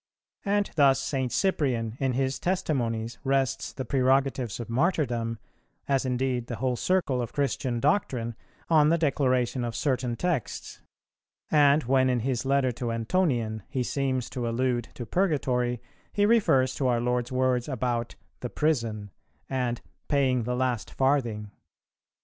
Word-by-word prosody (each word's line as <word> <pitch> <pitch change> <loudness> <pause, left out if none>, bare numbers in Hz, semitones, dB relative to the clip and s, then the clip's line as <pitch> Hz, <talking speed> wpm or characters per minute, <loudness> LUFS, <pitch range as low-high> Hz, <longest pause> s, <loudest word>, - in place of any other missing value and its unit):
And 205 0 +1
thus 135 -2 +5
St. 135 -2 -2
Cyprian, 125 - 0
in 135 -2 +1
his 130 +1 -1
Testimonies, 125 -11 -1
rests 135 -1 0
the 130 - -5
prerogatives 130 -3 +1
of 120 - -5
martyrdom, 120 -5 0 0.5
as 135 -1 +1
indeed 125 -1 -1
the 120 - -4
whole 125 +3 -1
circle 150 -4 +1
of 120 - -5
Christian 130 -3 -1
doctrine, 125 - 0 0.3
on 155 -2 +5
the 165 - +3
declaration 130 -5 +1
of 120 -1 -3
certain 125 -4 0
texts; 165 - -3 0.7
and, 145 0 +5
when 130 +1 +3
in 125 -2 +1
his 130 +1 -1
letter 135 -2 +2
to 120 0 -3
Antonian 115 -3 0
he 130 - -1
seems 130 -1 -1
to 120 -2 -2
allude 120 0 0
to 120 - -6
Purgatory, 125 - 0 0.3
he 205 - +2
refers 135 - +3
to 135 - -1
our 120 -2 +2
Lord's 125 0 -1
words 130 -1 +1
about 120 -3 -2 0.2
"the 125 - -4
prison" 115 -10 -1 0.4
and 125 -2 -1 0.3
"paying 130 -5 +2
the 125 +1 -1
last 125 -5 -1
farthing." 120 -7 0
130 Hz, 145 wpm, -27 LUFS, 120-140 Hz, 0.7 s, thus